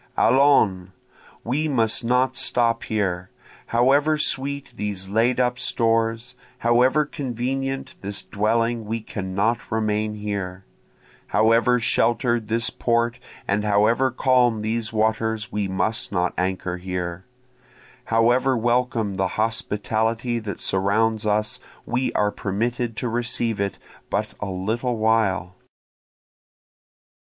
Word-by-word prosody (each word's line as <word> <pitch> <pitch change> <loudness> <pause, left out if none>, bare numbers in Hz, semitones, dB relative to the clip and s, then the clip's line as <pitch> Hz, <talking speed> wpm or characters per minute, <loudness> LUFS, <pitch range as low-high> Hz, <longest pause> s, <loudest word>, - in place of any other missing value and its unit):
Allons! 115 -10 +4 0.5
we 145 +6 -1
must 115 -5 +1
not 125 +2 +2
stop 115 -2 +2
here, 95 -4 -2 0.4
However 140 +6 +3
sweet 140 -2 0
these 100 -3 -3
laid 115 +5 +2
up 125 0 +1
stores, 115 +1 +1 0.2
however 125 +5 +3
convenient 135 -1 -3
this 100 0 -5
dwelling 115 +2 0
we 115 +2 -2
cannot 100 +3 -1
remain 105 -1 0
here, 100 -3 -5 0.6
However 115 +2 +3
shelter'd 120 0 +1
this 115 +1 0
port 120 +1 0 0.3
and 100 +1 0
however 105 +5 +3
calm 125 -3 +2
these 110 +1 -2
waters 110 0 0
we 105 -1 -1
must 105 +4 -1
not 90 -2 0
anchor 90 0 -2
here, 90 0 -5 0.8
However 120 +3 +3
welcome 120 -3 0
the 95 - +1
hospitality 110 +2 -1
that 105 -3 -6
surrounds 110 +3 +1
us 105 +4 0 0.3
we 125 +2 -1
are 105 0 +1
permitted 115 +4 -2
to 125 - -2
receive 115 -2 -1
it 100 -1 -2 0.3
but - - -2
a 105 - -4
little 110 +6 -2
while. 105 -5 +1
115 Hz, 110 wpm, -23 LUFS, 105-120 Hz, 0.8 s, Allons